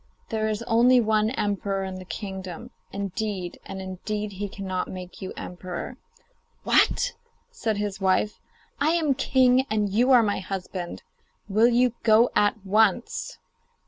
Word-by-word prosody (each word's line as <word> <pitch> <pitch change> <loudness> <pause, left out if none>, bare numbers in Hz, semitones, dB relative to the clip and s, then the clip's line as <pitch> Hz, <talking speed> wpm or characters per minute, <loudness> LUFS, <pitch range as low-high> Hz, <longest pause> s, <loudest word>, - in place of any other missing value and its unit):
There 220 -1 0
is 215 +1 -2
only 240 +2 +5
one 215 -1 +2
emperor 200 -4 -1
in 190 -1 -5
the 185 - -10
kingdom. 190 +3 -7 0.2
Indeed 200 -2 -4
and 190 - -6
indeed 205 +3 -4
he 200 +1 -5
cannot 190 -2 -3
make 180 -1 -9
you 190 - -5
emperor.' 180 +6 -6 0.7
'What!' - - +3 0.4
said 225 - -2
his 205 -1 -3
wife. 195 +3 +1 0.4
'I 290 +2 +3
am 320 -5 +2
king, 260 -1 +3
and 210 -1 +1
you 245 +5 +3
are 250 -3 +7
my 205 -2 0
husband. 185 -2 -5 0.4
Will 215 +3 +4
you 245 0 +3
go 225 +2 +5
at 205 0 +2
once? 215 +3 +1
210 Hz, 145 wpm, -25 LUFS, 190-230 Hz, 0.7 s, are